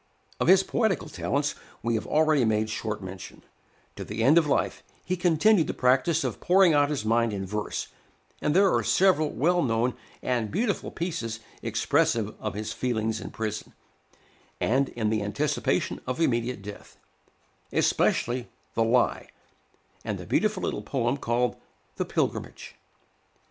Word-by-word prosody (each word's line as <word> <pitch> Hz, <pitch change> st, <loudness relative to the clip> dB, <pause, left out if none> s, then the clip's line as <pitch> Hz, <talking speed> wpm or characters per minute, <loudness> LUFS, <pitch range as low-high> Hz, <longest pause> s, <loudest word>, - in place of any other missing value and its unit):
Of -, -, 0 dB
his 190 Hz, +2 st, +7 dB
poetical 205 Hz, -7 st, 0 dB
talents 145 Hz, -1 st, -1 dB, 0.3 s
we 115 Hz, +1 st, 0 dB
have 110 Hz, -, -2 dB
already 155 Hz, -3 st, +3 dB
made 110 Hz, -1 st, +1 dB
short 105 Hz, -1 st, -4 dB
mention; 95 Hz, 0 st, -9 dB, 0.5 s
to -, -, -6 dB
the 110 Hz, +2 st, -3 dB
end 150 Hz, +7 st, +6 dB
of 155 Hz, -, -1 dB
life 145 Hz, -, 0 dB, 0.2 s
he 185 Hz, -, 0 dB
continued 175 Hz, +2 st, +3 dB
the -, -, -3 dB
practice 130 Hz, +6 st, +2 dB
of -, -, -3 dB
pouring 185 Hz, -2 st, +5 dB
out 145 Hz, -1 st, +4 dB
his 140 Hz, -8 st, -2 dB
mind 115 Hz, 0 st, +2 dB
in 95 Hz, -1 st, -3 dB
verse, 105 Hz, +2 st, -4 dB, 0.5 s
and 150 Hz, -, +1 dB
there 195 Hz, 0 st, +5 dB
are -, -, +3 dB
several 180 Hz, -5 st, +3 dB
well 175 Hz, +8 st, +2 dB
known 120 Hz, -2 st, +1 dB, 0.3 s
and 120 Hz, -4 st, 0 dB
beautiful 205 Hz, +3 st, -1 dB
pieces 115 Hz, -10 st, -4 dB, 0.2 s
expressive -, -, +1 dB
of -, -, -4 dB
his 105 Hz, +1 st, -4 dB
feelings 110 Hz, -3 st, -1 dB
in -, -, -6 dB
prison, 110 Hz, -1 st, -5 dB, 0.9 s
and 135 Hz, +3 st, +2 dB
in 110 Hz, -2 st, -1 dB
the 110 Hz, -1 st, 0 dB
anticipation 100 Hz, 0 st, -1 dB
of 130 Hz, +3 st, -2 dB
immediate 120 Hz, -7 st, 0 dB
death; 105 Hz, 0 st, -10 dB, 0.7 s
especially 120 Hz, +1 st, +1 dB, 0.2 s
"The 115 Hz, -, +2 dB
Lie," 120 Hz, +2 st, +2 dB, 0.8 s
and -, -, -3 dB
the -, -, -8 dB
beautiful -, -, 0 dB
little -, -, -2 dB
poem 120 Hz, -1 st, -1 dB
called 125 Hz, -2 st, 0 dB, 0.4 s
"The -, -, -1 dB
Pilgrimage." -, -, -3 dB
125 Hz, 150 wpm, -27 LUFS, 110-160 Hz, 0.9 s, his